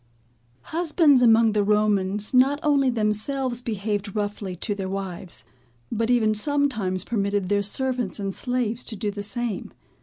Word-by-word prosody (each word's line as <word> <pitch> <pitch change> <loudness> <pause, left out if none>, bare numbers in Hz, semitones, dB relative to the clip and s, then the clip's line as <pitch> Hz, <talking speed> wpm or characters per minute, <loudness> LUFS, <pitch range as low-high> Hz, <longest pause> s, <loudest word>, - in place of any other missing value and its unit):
Husbands 315 -5 +4
among 225 -1 +5
the 210 -1 +1
Romans 210 0 +1
not 270 +3 +4
only 280 -3 +3
themselves 240 +3 0
behaved 205 -3 -3
roughly 205 -2 -3
to 205 +4 -3
their 195 -2 -4
wives, 185 - -4 0.5
but 230 0 -1
even 225 -3 +3
sometimes 215 - 0
permitted 200 -4 -1
their 205 0 +2
servants 245 0 -1
and 195 -1 -3
slaves 245 -1 -2
to 225 - -4
do 210 0 -2
the 205 0 -6
same. 230 0 -4
215 Hz, 145 wpm, -24 LUFS, 200-250 Hz, 0.5 s, among